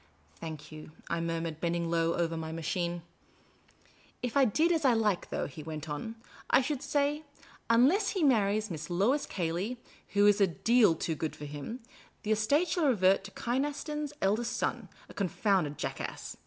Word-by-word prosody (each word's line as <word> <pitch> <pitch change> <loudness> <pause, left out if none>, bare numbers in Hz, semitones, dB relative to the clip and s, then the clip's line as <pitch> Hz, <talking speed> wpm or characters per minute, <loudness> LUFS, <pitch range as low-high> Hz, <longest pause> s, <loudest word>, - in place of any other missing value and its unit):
" 75 +2 -33
Thank 160 -2 -7
you," 155 0 -10 0.2
I 170 0 0
murmured, 165 -1 -3
bending 170 0 0
low 165 0 +2
over 165 -1 0
my 160 -1 -4
machine. 170 +1 -2 0.6
" - - -31
If 245 -2 -2
I 275 -1 +6
did 310 +10 +2
as 325 -2 +1
I 260 -3 +5
like, 215 -5 +1
though," - - -2
he 150 +2 -8
went 155 0 -6
on, 150 +10 -4 0.2
" - - -19
I - - +6
should 275 0 -2
say. 290 +1 0 0.5
Unless 290 - +4
he 375 - -1
marries 215 -5 +2
Miss 155 0 -5
Lois 245 +12 +1
Cayley 180 +7 -2 0.4
(who 205 0 +5
is 205 0 +5
a 195 - +6
deal 220 +1 +4
too 160 - -2
good 160 0 -3
for 150 - -8
him), 145 - -6 0.4
the 215 - -1
estate 280 +11 +2
shall 350 -4 +2
revert 195 -6 +4
to - - -7
Kynaston's 290 +4 -2
eldest 230 +5 +1
son, 230 -6 -2 0.2
a - - -13
confounded 185 -6 0
jackass. - - -5
200 Hz, 180 wpm, -30 LUFS, 165-250 Hz, 0.6 s, I